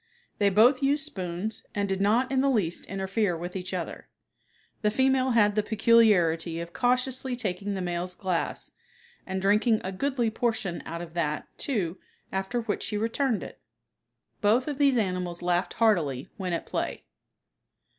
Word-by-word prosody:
They 205 -1 +4
both 235 +8 +5
used 285 +2 +2
spoons 185 - -4
and 200 -1 0
did 195 0 -1
not 235 +6 +2
in 265 -1 +2
the 275 - +3
least 195 -10 0
interfere 195 -1 -1
with 175 +3 -6
each 185 -1 -4
other. 180 -3 -5 0.7
The 210 - +3
female 260 +2 +2
had 210 -2 +5
the 215 - +2
peculiarity 205 -7 +3
of 170 0 -7
cautiously 255 +4 0
taking 200 -3 -3
the 190 - -3
male's 175 +1 -3
glass, 185 -3 -2 0.6
and 190 0 -2
drinking 210 +3 +3
a 190 - -3
goodly 245 +2 0
portion 220 -6 -1
out 170 +1 -5
of 165 -1 -11
that, 155 -3 -1
too, 190 - -2 0.3
after 195 +5 -1
which 220 -3 -2
she 210 - -3
returned 225 - 0
it. - - -10 0.8
Both 225 +6 +3
of 290 -2 -3
these 275 -3 +4
animals 180 -4 -2
laughed 175 0 +1
heartily 165 - +1
when 185 -4 -3
at 170 - -2
play. - - -3
205 Hz, 160 wpm, -27 LUFS, 180-235 Hz, 0.8 s, both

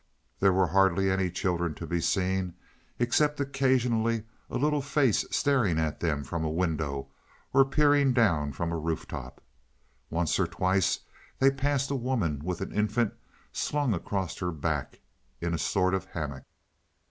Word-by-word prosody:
There 95 0 +5
were 95 0 +3
hardly 95 +2 +3
any 95 -1 +1
children 85 -3 -1
to - - -6
be 85 -1 -1
seen, 95 0 0 0.4
except 145 +5 +2
occasionally 125 -5 +1 0.3
a - - -2
little 150 +2 +1
face 140 -4 +2
staring 125 - +2
at 80 -1 -1
them 75 -4 -1
from 80 +4 -3
a 80 - 0
window, 80 -5 -2 0.4
or 135 - +7
peering 145 -1 +4
down 85 - +2
from 85 +5 -3
a 85 - -2
roof 80 0 -3
top. - - -8 0.7
Once 85 +1 0
or 95 - +2
twice 90 +3 +1 0.4
they 135 +1 +5
passed 140 0 0
a - - +1
woman 115 - -1
with 90 +1 -3
an 95 - -4
infant 105 +2 +1 0.4
slung 145 -5 0
across 95 -1 -3
her 90 - -1
back 75 -3 -3 0.4
in 85 0 -2
a 80 - -1
sort 95 +2 +1
of 95 - -1
hammock. 75 -5 -5
95 Hz, 160 wpm, -28 LUFS, 85-125 Hz, 0.7 s, or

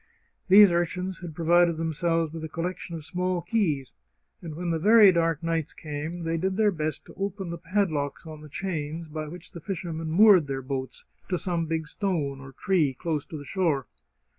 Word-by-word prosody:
These 200 0 +8
urchins 180 +2 -1
had 170 -4 -8
provided 170 0 +3
them 160 0 -2
selves 165 0 0
with 165 -1 -6
a 160 - -5
collection 170 +1 -4
of 155 -2 -8
small 180 0 -1
keys, 170 - 0 0.5
and 160 -3 -7
when 175 +1 -2
the 165 - 0
very 210 +2 +7
dark 165 -2 0
nights 165 -2 -1
came, 155 +3 -5
they 165 0 -1
did 190 +3 -1
their 215 -2 +4
best 155 -3 -3
to - - -13
open 195 -2 -4
the 170 - -6
padlocks 165 -6 -1
on 155 -1 -9
the 150 - -11
chains 160 -1 -4
by 155 0 -5
which 170 +2 -10
the 170 - -9
fishermen 165 -3 -4
moored 185 -2 +6
their 135 -1 -3
boats 130 0 -5 0.2
to 180 - +1
some 170 -2 -2
big 160 -1 -2
stone 150 -8 -2
or 135 0 -10
tree 155 -2 +1
close 155 0 -3
to 160 - -7
the 145 - -9
shore. 155 -6 0
165 Hz, 195 wpm, -26 LUFS, 155-180 Hz, 0.5 s, These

